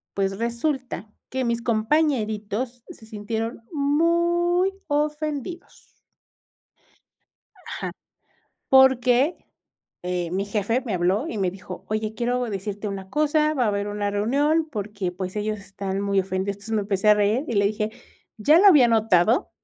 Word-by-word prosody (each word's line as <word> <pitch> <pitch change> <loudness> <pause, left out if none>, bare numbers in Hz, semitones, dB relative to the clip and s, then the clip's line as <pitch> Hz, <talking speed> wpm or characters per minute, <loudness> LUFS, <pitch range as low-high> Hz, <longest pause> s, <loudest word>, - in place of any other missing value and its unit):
pues, 195 0 -1
resulta 235 -1 -2 0.2
que 260 -1 -2
mis 235 0 0
compañeritos 230 -2 0
se 220 - -10
sintieron 220 +2 -4
muy 340 +5 +2
ofendidos. 300 +2 -4 1.6
Ajá. - - -5 0.8
Porque, 265 +3 +5 0.7
eh, 180 -1 -2
mi 190 +3 -1
jefe 210 +4 -1
me 220 - -2
habló 185 - +1
y 220 - -4
me 190 -2 +1
dijo: 185 0 -10
"Oye, 215 0 -2
quiero 245 +2 -1
decirte 205 -1 -4
una 195 -1 -6
cosa, 305 +3 +2
va 255 -4 +1
a - - +2
haber 200 0 -1
una 205 0 -2
reunión, 285 +10 +1
porque, 205 -4 -4
pues, 185 +2 -6
ellos 215 0 -2
están 195 -1 -5
muy 200 -1 +1
ofendidos". 190 +1 -2
Entonces, 210 +3 -6
me 215 - +2
empecé 195 0 0
a 210 - +8
reír 210 +6 +1
y 235 - -2
le 200 -1 +3
dije: 215 +1 -1 0.5
"Ya 295 +9 +5
lo 400 - +6
había 295 -11 +7
notado, 220 -1 +3
220 Hz, 145 wpm, -24 LUFS, 200-270 Hz, 1.6 s, a